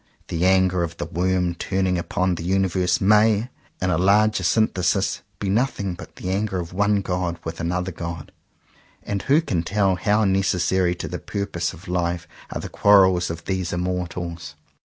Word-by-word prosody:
The 85 +2 +1
anger 95 -1 +3
of 85 0 -3
the - - -3
worm 90 0 0
turning 95 +1 -1
upon 90 +1 0
the 85 - -5
universe 95 -1 +1
may, 105 +3 +3 0.3
in 90 0 0
a 80 - +1
larger 105 +2 +3
synthesis, 90 -3 +1 0.2
be 100 - -4
nothing 100 -2 0
but 90 - -11
the 95 - -4
anger 100 -1 -1
of 85 0 -6
one 100 +1 +2
god 90 -2 -2
with 85 0 -6
another 90 +2 -2
god. 85 -2 -6 0.7
And 100 -1 -3
who 145 +4 +3
can 95 - -1
tell 95 +1 +1
how 105 +3 +2
necessary 95 -2 +1
to 80 - -5
the 90 +3 -5
purposes 100 -5 -3
of 85 - -15
life 85 -1 -1 0.2
are - - -4
the - - -5
quarrels 95 -3 +4
of 85 0 -6
these 95 -2 -2
immortals? 90 -2 -4
90 Hz, 170 wpm, -23 LUFS, 85-100 Hz, 0.7 s, quarrels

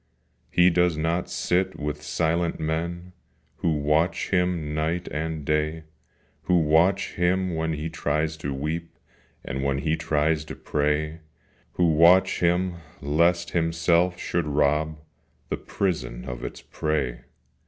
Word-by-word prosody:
He 90 +1 +5
does 90 -2 +2
not 85 +3 -1
sit 90 +2 0
with 75 0 -3
silent 85 +2 0
men 85 +3 -3 0.4
Who 85 - +1
watch 75 +4 +1
him 90 -5 0
night 80 +3 -1
and 80 -1 -3
day; 75 +2 0 0.6
Who 90 - +3
watch 80 +5 +3
him 90 +1 +1
when 80 0 -1
he 75 +1 -3
tries 80 0 -1
to 70 -2 -4
weep, 75 +5 -4 0.5
And 65 0 -3
when 70 -1 +1
he 80 +3 0
tries 80 -1 +1
to - - -7
pray; 75 +2 -1 0.5
Who 85 -2 +3
watch 85 +4 +5
him 90 +1 +1 0.2
lest 85 +4 +2
himself 85 +1 +2
should 85 -2 -2
rob 75 +2 +1 0.5
The - - -1
prison 80 -11 -3
of - - -6
its - - -7
prey. 65 -6 -2
80 Hz, 130 wpm, -25 LUFS, 75-85 Hz, 0.6 s, He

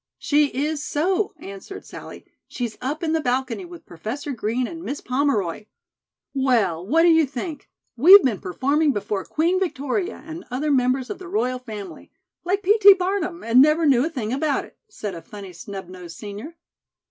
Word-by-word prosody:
"She 295 0 +2
is 290 +3 -2
so," 380 +8 0
answered 200 - -9
Sallie. - - -10 0.2
"She's 240 -4 -4
up 290 +6 -3
in 320 -1 0
the 320 - +1
balcony 260 +5 -1
with 345 -2 -12
Professor 225 - -6
Green 240 +1 -1
and 330 +6 -7
Miss 290 -4 -4
Pomeroy." 235 - -1 0.7
"Well, 230 - +1
what 320 - +3
do 345 - +6
you 320 -2 +5
think, 295 +3 -6 0.3
we've 365 - +9
been 230 -7 0
performing 280 - +1
before 205 -2 -3
'Queen 340 +4 0
Victoria 340 +2 -2
and 325 +2 -8
other 280 +4 -1
members 255 -1 +1
of 415 - -6
the 370 - -9
royal 255 -10 -1
family,' 215 -5 -9 0.3
like 390 +3 -1
P. 420 +4 +4
T. 400 -1 +9
Barnum, 365 -2 -2
and 235 +3 +5
never 305 +3 +4
knew 260 -4 +4
a 320 - -1
thing 245 -8 -4
about 280 +1 0
it," - - -19
said 210 - -6
a 165 - -8
funny 195 +2 -10
snub 190 +1 -8
nosed 180 -2 -10
senior. 215 +11 -8
275 Hz, 180 wpm, -23 LUFS, 225-330 Hz, 0.7 s, we've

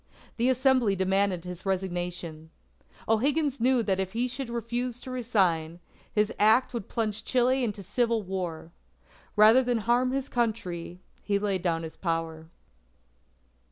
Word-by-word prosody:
The 240 +2 +2
Assembly 255 -5 +3
demanded 190 -1 +1
his 180 -1 -8
resignation. 175 -4 -3 0.6
O'Higgins 280 +5 +1
knew 250 -1 +3
that 190 -3 0
if 190 -1 -2
he 240 +2 0
should 255 0 -5
refuse 235 +1 -3
to 260 - -8
resign, 185 -10 0 0.3
his 210 0 +1
act 220 +6 +4
would 235 -5 -5
plunge 220 -2 -2
Chile 255 +1 +2
into 205 -4 -3
civil 230 +3 0
war. 180 -4 -5 0.6
Rather 220 +4 +7
than 245 -2 0
harm 240 +3 +2
his 270 0 -2
Country, 215 -9 -2 0.2
he 200 -1 0
laid 200 -2 -1
down 165 -2 -1
his 160 - -8
power. 165 -2 -3
215 Hz, 140 wpm, -27 LUFS, 180-245 Hz, 0.6 s, Rather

